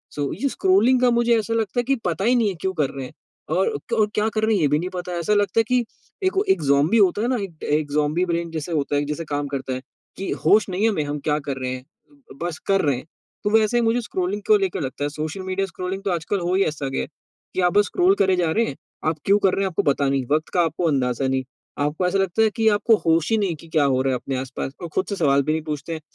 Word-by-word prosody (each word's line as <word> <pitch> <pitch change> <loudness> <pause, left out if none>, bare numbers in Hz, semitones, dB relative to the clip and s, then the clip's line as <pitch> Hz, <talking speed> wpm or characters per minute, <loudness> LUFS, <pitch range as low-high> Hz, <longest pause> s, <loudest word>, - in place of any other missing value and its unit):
सो 145 -2 -2
ये 275 - +2
स्क्रोलिंग 225 +7 +3
का 250 - +5
मुझे 235 0 +3
ऐसा 225 +2 -3
लगता 225 +2 0
है - - +1
कि 270 +2 +1
पता 175 +3 -1
ही 245 +2 +4
नहीं 225 -4 +3
है, 190 - -4
क्यों 190 0 -1
कर 150 -5 0
रहे 135 -2 -6
हैं - - -11 0.4
और 455 -2 +1
क - - 0
और 210 - +4
क्या 215 +1 +2
कर 215 0 -2
रहे 220 -1 +3
हैं? 185 - +1
ये 150 - +4
भी 150 +2 +2
नहीं 180 +2 -3
पता 180 0 -5
है। 175 - -2
ऐसा 170 +5 +1
लगता 205 +1 +2
है - - +5
कि 250 -1 +2 0.4
एक 375 - +2
हो 395 - +3
एक 385 - +3
ज़ॉम्बी 140 +9 +3
होता 205 0 +3
है 235 - +1
ना, 255 - +1
एक 170 -5 -9
अ, - - -3
एक 150 0 0
ज़ॉम्बी 150 +4 +1
ब्रेन 170 -1 -2
जैसे 160 +1 -4
होता 145 -2 0
है 145 - +2
कि - - -2
जैसे 150 +3 -4
काम 145 -1 -2
करता 135 -2 -4
है 130 - -4 0.4
कि 195 - -4 0.2
होश 210 -1 +5
नहीं 190 +3 -2
है 225 - +5
हमें, 160 -8 0
हम 145 0 -3
क्या 150 - +2
कर 135 - -2
रहे 130 -1 -3
हैं, 130 0 -7 0.6
बस 175 -2 -3
कर 195 0 +3
रहे 140 -3 +1
हैं। 130 - -9 0.4
तो 205 - +1
वैसे 220 +2 +3
ही - - +3
मुझे 230 +2 +2
स्क्रॉलिंग 195 -1 -3
को 215 - +6
लेकर 195 -5 -2
लगता 135 +1 -4
है। 145 - 0
सोशल 155 +5 -5
मीडिया 190 +1 -1
स्क्रोलिंग 185 +2 -5
तो 195 - 0
आजकल 175 +4 -1
हो 175 +1 -1
ही 195 - +4
ऐसा 145 -5 -2
गया 135 - -2
कि 185 +4 -9
आप 180 +1 +2
बस 205 0 +4
स्क्रॉल 365 - +3
करे 190 - +3
जा 170 -3 +1
रहे 230 +4 +2
हैं, 135 - -5 0.3
आप 160 0 +1
क्यों 200 +1 +5
कर 190 -2 +2
रहे 195 - -1
हैं? 195 - +1
आपको 175 - -1
पता 140 -1 +2
नहीं, 135 -2 0
वक़्त 155 +1 +1
का 175 - +3
आपको 170 +1 0
अंदाज़ा 130 -2 0
नहीं। 130 0 0 0.4
आपको 150 +5 0
ऐसा 195 +2 +1
लगता 195 +2 +1
है 220 - +4
कि 225 -1 +1
आपको 215 +2 +4
होश 165 +2 +3
ही 225 - +4
नहीं 190 -6 0
कि 165 +2 -15
क्या 155 -2 +2
हो 130 -2 +2
रहा 135 0 +1
है 125 - -1
अपने 135 - -4
आस-पास 135 +1 -5
और 175 - -4
खुद 190 - 0
से 200 - -2
सवाल 140 -5 +3
भी 155 - 0
नहीं 160 - -1
पूछते 155 +1 -4
हैं। 160 - -6
175 Hz, 300 wpm, -22 LUFS, 145-205 Hz, 0.6 s, को